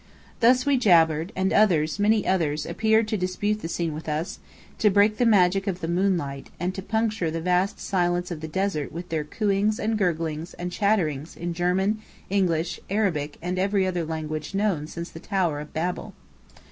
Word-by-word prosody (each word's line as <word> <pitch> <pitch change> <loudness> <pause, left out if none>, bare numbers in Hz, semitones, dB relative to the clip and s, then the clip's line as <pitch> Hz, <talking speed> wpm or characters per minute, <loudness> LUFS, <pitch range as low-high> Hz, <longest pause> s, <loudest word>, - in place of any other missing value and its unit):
Thus 250 +2 +4
we 280 -2 +3
jabbered; 165 -4 +4
and 190 0 0
others, 170 -5 +3
many 210 0 +3
others, 155 -5 +1
appeared 220 0 +2
to 215 - 0
dispute 205 +3 -1
the - - -4
scene 165 -1 -2
with 155 +1 -6
us, 155 +4 -3 0.4
to 210 - +5
break 205 +2 +3
the 245 - +4
magic 195 -2 +4
of 185 -2 -1
the 165 - -4
moonlight, 170 -6 -1
and 180 +2 -1
to 190 - -5
puncture 220 -3 0
the 165 +1 -3
vast 180 +3 +1
silence 175 -1 0
of 160 -3 -5
the 160 - -4
desert 185 -3 -2
with 175 +3 -7
their 160 -2 -1
cooings 205 +5 0
and 220 0 0
gurglings 165 -2 -1
and 180 0 -5
chatterings 175 -8 0
in 175 0 -3
German, 185 +5 +1 0.3
English, 175 -4 +1
Arabic, 175 -8 0
and 180 +1 -2
every 195 0 +2
other 180 -2 -1
language 155 +1 -4
known 195 -7 0
since 170 +1 -7
the 165 - -9
Tower 175 -5 -1
of 150 0 -8
Babel. 175 +3 -3
180 Hz, 185 wpm, -25 LUFS, 160-200 Hz, 0.4 s, to